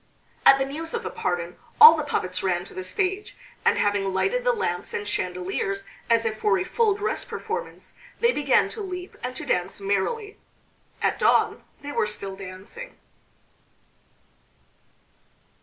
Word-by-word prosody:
At 270 - +9
the 270 - 0
news 320 - -5
of 465 - -3
the - - -4
pardon 175 -1 -3 0.2
all 315 +1 +12
the 310 - -1
puppets 185 -11 -2
ran 180 -2 0
to - - -13
the 185 - -5
stage, 385 - -2 0.3
and - - +3
having 205 -1 +1
lighted 400 - 0
the - - +3
lamps 180 - -2
and 205 - -3
chandeliers 190 +1 -2 0.3
as 230 0 +3
if 215 -1 -2
for 200 -2 +3
a 185 - 0
full 435 - +1
dress 415 +1 -1
performance, 460 +3 -6 0.3
they 470 0 +4
began - - +3
to 440 - -6
leap 365 -2 -6
and 250 +1 -4
to - - -5
dance 180 +2 -1
merrily. 200 - -2 0.6
At - - +1
dawn - - +3 0.2
they 290 - -5
were 215 - +1
still 200 -2 -4
dancing. 190 - -9
215 Hz, 155 wpm, -25 LUFS, -, 0.6 s, all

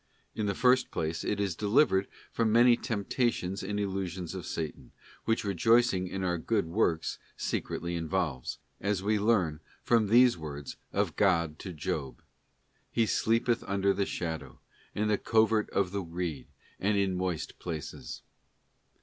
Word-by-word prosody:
In 110 -1 -2
the 100 - 0
first 130 0 +4
place, 80 +1 -2
it 105 - -1
is 100 -3 0
delivered 100 - +3 0.2
from 115 -2 +1
many 120 +2 +6
temptations 110 -4 -1
and 105 +2 -3
illusions 95 -3 -3
of 95 -2 -6
Satan, 80 -2 -5 0.3
which 115 - +1
rejoicing 100 0 +3
in 95 +1 -4
our 90 -2 0
good 105 +4 0
works 85 -2 0 0.2
secretly 85 +1 -2
involves, 80 -6 -2 0.2
as 100 -1 -1
we 105 +1 +2
learn 100 -8 +2 0.2
from 115 -3 +3
these 120 -2 +5
words 75 -3 -6 0.2
of - - 0
God 85 -6 +2
to 95 - -6
Job: 70 -4 -4 0.7
'He 115 - +2
sleepeth 115 +2 +1
under 100 0 +2
the 100 - -1
shadow, 80 -2 -4 0.4
in 105 +1 +1
the 105 -1 +2
covert 110 -1 +3
of 95 -2 0
the 100 0 -2
reed, 85 -3 -4 0.3
and 100 +1 +1
in 100 -1 +2
moist 90 -3 -3
places. 80 -4 -6
95 Hz, 150 wpm, -30 LUFS, 85-110 Hz, 0.7 s, many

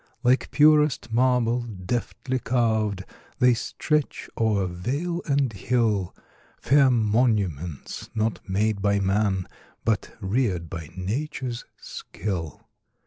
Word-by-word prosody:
Like 125 +1 +3
purest 150 -6 +4
marble, 125 -1 +3
deftly 120 +4 -3
carv'd, 110 -6 0 0.3
They 125 0 +5
stretch 150 +4 -2
o'er 105 -4 +1
vale 140 - -2
and 140 -4 +1
hill, 105 -2 0 0.4
Fair 140 0 +5
monuments, 105 - 0
not 110 0 0
made 105 +1 +1
by 100 0 +2
man, 95 -1 +1 0.4
But 110 -3 -1
rear'd 95 - -1
by 80 -4 -6
nature's 120 +5 -3
skill. 85 -6 -6
110 Hz, 100 wpm, -25 LUFS, 95-125 Hz, 0.4 s, They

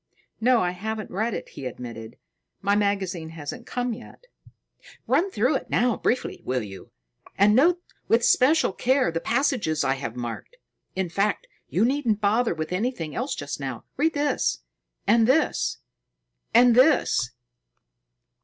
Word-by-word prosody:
"No, 245 +1 +4
I 180 - +1
haven't 215 +4 -5
read 220 +4 -1
it," - - -6
he 135 - -7
admitted. 115 -3 -8 0.4
"My 200 +1 +1
magazine 195 -5 -1
hasn't 165 +10 -8
come 245 -1 -2
yet." 360 - -12 0.8
"Run 390 - +2
through 255 - +1
it - - -11
now 245 -2 +2
briefly, 250 - -1
will 125 -2 -1
you? 95 -2 -10 0.5
And 205 +2 +5
note 340 +7 +4 0.3
with 230 +1 +4
especial 265 0 +4
care 260 -3 +2
the 165 - -2
passages 240 - 0
I 135 - +2
have 135 -4 -5
marked. 120 - -6 0.4
In 190 -1 -1
fact, 200 +4 0 0.2
you 195 +6 +2
needn't 245 -5 +1
bother 215 0 +2
with 155 +2 -4
anything 185 - -2
else 255 +4 -2
just 145 0 -5
now. 130 -4 -5
Read 315 +3 +1
this 285 - 0 0.4
and 225 +2 +4
this 290 +5 +2 0.7
and 240 +1 +6
this." 250 - +3
210 Hz, 145 wpm, -25 LUFS, 160-250 Hz, 0.8 s, and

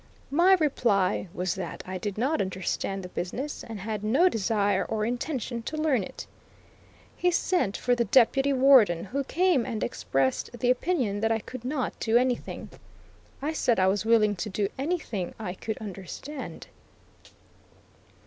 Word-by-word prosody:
My 345 +6 +5
reply 225 - +1
was 180 -1 -2
that 185 -3 -6
I 185 0 -5
did 205 +1 -4
not 275 +8 +1
understand 190 +1 -2
the 180 - -7
business, 250 +13 -4
and 225 -3 -7
had 210 +1 -4
no 275 +13 +4
desire 205 - +1
or 215 -1 -2
intention 245 -1 -3
to 310 +7 -5
learn 305 -7 +2
it. - - -8 0.9
He 360 - +2
sent 345 - +1
for 245 - +1
the 240 -1 +1
Deputy 270 +2 +4
Warden, 255 -10 +5
who 275 +8 -2
came 345 -2 +2
and 230 -4 -3
expressed 135 -1 -1
the 245 +1 +3
opinion 255 - 0
that 225 +1 +1
I 225 - +3
could 240 +2 -9
not 260 0 -2
do 225 +1 +3
anything. 250 0 -1 0.7
I 310 +2 -1
said 240 -8 +1
I 185 - +4
was 195 +1 0
willing 220 -2 +4
to 210 +4 -3
do 200 0 -1
anything 270 - -3
I 195 -5 -4
could 220 +3 -5
understand. 215 - -7
230 Hz, 160 wpm, -27 LUFS, 200-275 Hz, 0.9 s, My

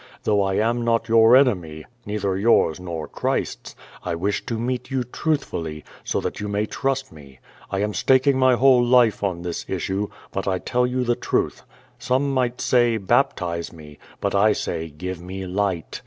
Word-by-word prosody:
Though 105 -1 +2
I 95 -1 0
am 115 +3 +1
not 115 -1 +1
your 115 +1 +6
enemy 90 - +2
— 120 - -38
neither 100 -2 -1
yours 95 -6 +3
nor 85 -4 -5
Christ's - - -3
— - - -21
I 85 -2 -2
wish 100 +5 -1
to 115 -3 -2
meet 125 +2 -3
you 135 -2 -1
truthfully, 115 - -3 0.2
so - - -1
that - - -4
you 105 - -4
may 105 +1 -1
trust 135 +3 -2
me. 70 -4 -15 0.3
I 100 0 -2
am 105 0 -2
staking 130 +3 +3
my 130 -1 +5
whole 125 0 +5
life 120 -2 +4
on 90 -4 -2
this 85 -1 -4
issue. 95 +2 -2 0.2
But - - -4
I 95 -1 +1
tell 125 +6 0
you 125 0 -1
the 120 -1 +1
truth. - - -1 0.4
Some 135 +2 0
might 125 -2 0
say, 120 -2 +3
'Baptize 95 -6 0
me.* 75 -3 -13 0.2
But - - -1
I 105 +2 +4
sa}', - - -3 0.2
^Give 90 +4 -6
me 95 +2 -6
light.' 95 -3 -2
105 Hz, 185 wpm, -23 LUFS, 90-125 Hz, 0.4 s, your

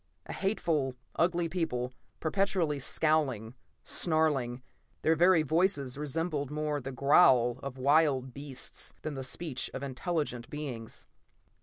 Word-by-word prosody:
A - - -6
hateful, 160 -10 0 0.2
ugly 170 0 +2
people, 140 -8 -2 0.3
perpetually 175 -3 0
scowling, 135 -6 +1 0.3
snarling; 145 -7 +1 0.4
their 160 - +4
very 175 0 +5
voices 155 -4 +1
resembled 150 0 -2
more 150 -1 -2
the 135 +2 -5
growl 130 -3 +5
of 135 -1 -6
wild 135 -2 +3
beasts 140 -1 -5
than 155 - -3
the 135 -1 -5
speech 135 0 -2
of 130 - -5
intelligent 140 -3 -3
beings. 130 -7 -6
145 Hz, 120 wpm, -30 LUFS, 130-160 Hz, 0.4 s, very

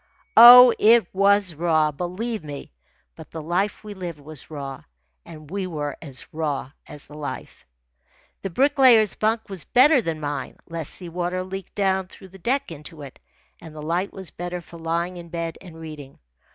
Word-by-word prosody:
Oh, 245 +1 +11
it 230 0 +5
was 200 -1 +3
raw, 155 -1 +1
believe 180 +7 -4
me; 145 - -9 0.4
but - - -12
the 165 - -7
life 180 +8 -2
we 210 -1 -8
lived 175 -5 -7
was 150 0 -10
raw, 140 -3 -7 0.4
and 155 -2 -13
we 195 -1 -3
were 150 -4 -4
as 140 -5 -8
raw 150 -4 -3 0.2
as 145 - -10
the 150 - -16
life. 150 - -8 0.7
The 195 - -4
Bricklayer's 255 - +4
bunk 220 +1 -1
was 190 -5 -5
better 270 +2 +5
than 165 -6 -4
mine. 145 -3 -5
Less 165 -3 -5
sea 180 -2 -4
water 180 +2 -3
leaked 190 +1 -8
down 190 -2 0
through 190 0 -15
the 195 +1 -15
deck 265 +4 -1
into 150 0 -10
it, 135 - -12 0.4
and 160 -2 -12
the 150 - -8
light 175 +5 -1
was 190 -5 -9
better 175 0 -5
for 170 -1 -13
lying 170 +2 -2
in 170 -1 -10
bed 165 -1 -5
and 165 -3 -12
reading. 150 -4 -10
175 Hz, 180 wpm, -23 LUFS, 155-200 Hz, 0.7 s, Oh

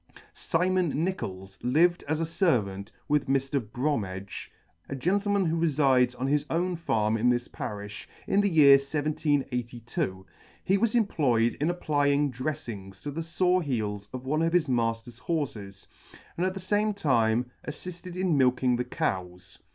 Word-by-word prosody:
SIMON 175 -3 0
NICHOLS 95 - -4
lived 170 +8 +3
as 155 +1 0
a 165 - 0
fervant 110 - 0 0.2
with 150 -1 +1
Mr. 135 +1 +1
Bromedge, 105 -6 -3 0.4
a 135 - -3
gentleman 200 +6 +1
who 165 0 +1
refides 135 -6 +3
on 130 - -1
his 145 +1 +2
own 175 +2 0
farm 110 -9 0
in 120 +3 +3
this 120 0 +1
parifh, 105 0 -6 0.2
in 200 - +3
the 205 - +2
year 145 -5 +8
1782. 130 -9 -2 0.4
He 195 - +2
was 230 +1 +1
employed 130 - +2
in 155 - +2
applying 145 -4 +1
dreflings 115 -8 -6
to 145 - -4
the 160 +4 -4
fore 180 +2 +1
heels 105 - -3
of 130 0 -7
one 155 +4 0
of 165 +1 +1
his 175 -3 +3
mailer's 115 -1 -1
horfes, 120 - -4 0.5
and 180 +2 0
at 185 - -3
the - - -4
fame 205 +3 0
time 120 - +1
attitted 175 +3 -7
in 185 -3 +1
milking 125 -2 +3
the 125 - 0
cows. 90 -6 -4
140 Hz, 150 wpm, -28 LUFS, 115-165 Hz, 0.5 s, year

